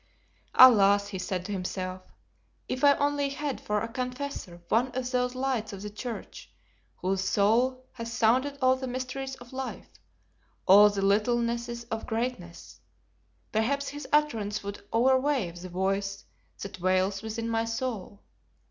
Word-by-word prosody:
"Alas!" 205 -5 +7
he 190 -2 -5
said 180 0 -3
to 205 - -5
himself, 185 -1 -4 0.7
"if 255 - -4
I 285 -1 +7
only 285 -1 0
had 280 -1 -4
for 210 0 -1
a - - -2
confessor 250 -6 -5
one 235 +6 +2
of 250 -1 -3
those 250 0 0
lights 255 -5 -2
of 195 0 -8
the 210 - -6
church, 230 +3 -7 0.4
whose 190 +1 -1
soul 245 +7 +2
has 230 -1 -7
sounded 255 +6 +2
all 255 0 +5
the 260 0 -5
mysteries 260 +1 -4
of 245 -1 -14
life, 265 0 -6 0.8
all 205 +2 +9
the 200 -1 -2
littlenesses 235 +3 +1
of 225 0 -3
greatness, 225 -7 -4 0.7
perhaps 275 +6 0
his 290 +1 -7
utterance 225 -10 +1
would 200 0 -7
overawe 260 -3 +2
the 175 +2 -9
voice 195 +2 -2 0.4
that 195 -1 -8
wails 185 +2 +1
within 225 +1 -4
my 225 0 0
soul. 225 -4 -4
230 Hz, 145 wpm, -28 LUFS, 200-255 Hz, 0.8 s, all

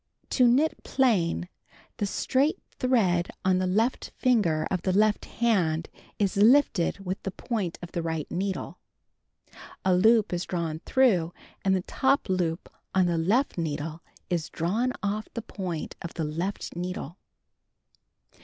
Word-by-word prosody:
To 250 -2 +5
knit 280 +7 +2
plain 200 -10 +1 0.5
the 205 - -1
straight 270 +9 +1 0.2
thread 195 -9 +2 0.2
on 185 -1 +3
the 185 0 0
second 225 +6 0
finger 205 - +2
of 185 -2 0
the 190 - 0
left 210 +2 +2
hand 180 -9 0 0.3
is 200 -2 0
lifted 210 -4 +4
with 185 +2 -3
the - - -3
point 195 -2 -3
of 175 - -7
the 170 - -2
right 160 -2 -2
needle. 190 +1 -3 0.7
Cut - - -29
2. - - -16 0.3
A 190 - +4
loop 220 +2 +4
is 175 +1 -1
drawn 165 -3 -3
through; 190 -11 +3 0.3
and 190 -1 +3
the 185 - -1
top 270 +3 +1
loop 175 -3 -1 0.3
on 185 -1 +4
the 170 -2 +1
left 210 +6 +1
needle 155 0 -3 0.3
is 170 -3 -2
drawn 215 +10 0
oflF 210 +1 -1
the 230 - -3
point 180 -8 -5
of 170 - -7
the 165 - -2
left 170 +7 -4
needle. 180 -1 -5
185 Hz, 155 wpm, -27 LUFS, 170-225 Hz, 0.7 s, To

